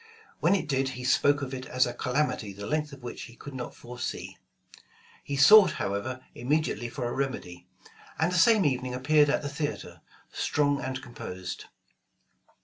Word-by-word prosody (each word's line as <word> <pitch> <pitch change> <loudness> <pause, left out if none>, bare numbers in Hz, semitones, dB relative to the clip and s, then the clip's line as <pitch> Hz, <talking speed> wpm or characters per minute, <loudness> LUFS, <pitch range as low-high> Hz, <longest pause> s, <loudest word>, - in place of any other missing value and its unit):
When 180 +4 +4
it 195 - -2
did, 135 -2 +1
he 125 - -6
spoke 145 +3 +3
of 135 0 -5
it 130 0 -6
as 130 0 +2
a 120 - -4
"calamity 125 -5 -1
the 100 +1 -8
length 150 +4 -1
of 140 -2 -12
which 120 - -6
he 115 - -14
could 145 +3 -10
not 125 -2 -6
foresee." 120 0 -6 0.9
He 140 - -4
sought 185 +5 +8
however 110 +6 -3
immediately 130 -2 -1
for 120 0 -4
a 120 - -3
remedy; 130 -10 -4 0.5
and 160 +2 +1
the - - -1
same 220 -1 +5
evening 130 -2 0
appeared 145 +3 +4
at 150 - +1
the - - -2
theater, 145 +1 -5 0.3
strong 145 -1 +1
and 130 -1 -3
composed. 95 -6 -7
135 Hz, 170 wpm, -28 LUFS, 125-150 Hz, 0.9 s, sought